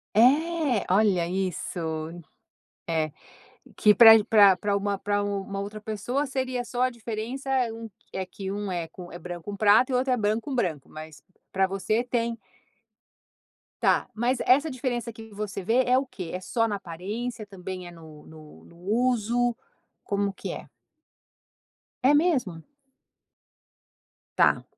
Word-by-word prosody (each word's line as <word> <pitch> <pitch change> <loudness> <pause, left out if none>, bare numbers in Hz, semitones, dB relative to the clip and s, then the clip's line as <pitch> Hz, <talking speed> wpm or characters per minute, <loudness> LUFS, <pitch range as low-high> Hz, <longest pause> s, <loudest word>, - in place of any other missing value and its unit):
É? 285 - +3
Olha 190 -5 +3
isso. 185 -1 -3 1.1
É, 155 -2 0 0.6
que 210 -1 +5
para 225 -1 +10
g 210 - 0
para 205 -4 +6
para 200 +2 0
uma 200 0 -1
para 205 +1 -1
u 200 -1 -2
uma 195 0 -5
outra 210 +1 -6
pessoa 220 +7 -2
seria 260 -2 -2
só 245 +1 -2
a 255 - +3
diferença 235 +3 -6 0.2
um 225 0 -8 0.2
é 190 -1 -3
que 190 +1 -7
um 200 -1 -3
é 170 -2 -3
com 175 0 -11
é 175 - -8
branco 175 -1 -7
com 200 - -6
prata 215 +5 +5
e - - +1
outro 255 0 +2
é - - +1
branco 215 +1 0
com 275 -3 -4
branco, 165 - -1
mas 155 -1 -10 0.3
para 190 0 +2
você 195 +4 0
tem 235 -1 -1 1.4
Tá, - - +3
mas 240 +3 0
essa 285 +4 +4
diferença 245 -2 -3
que 225 0 -12
você 200 -1 -4
vê 245 +6 +3
é 250 +1 +4
o 270 - 0
quê? 180 -9 -8
É 180 - -3
só 230 +4 0
na 205 - -2
aparência, 205 +6 -5
também 185 -2 -7
é - - -9
no 160 -3 -14
no 155 -1 -14
no 170 - -18
uso? 240 +3 +1 0.5
Como 200 -1 -1
que - - -6
é? - - -8 1.4
É 285 - +6
mesmo? 265 - +1 1.7
Tá, - - +4
210 Hz, 155 wpm, -26 LUFS, 190-245 Hz, 1.7 s, para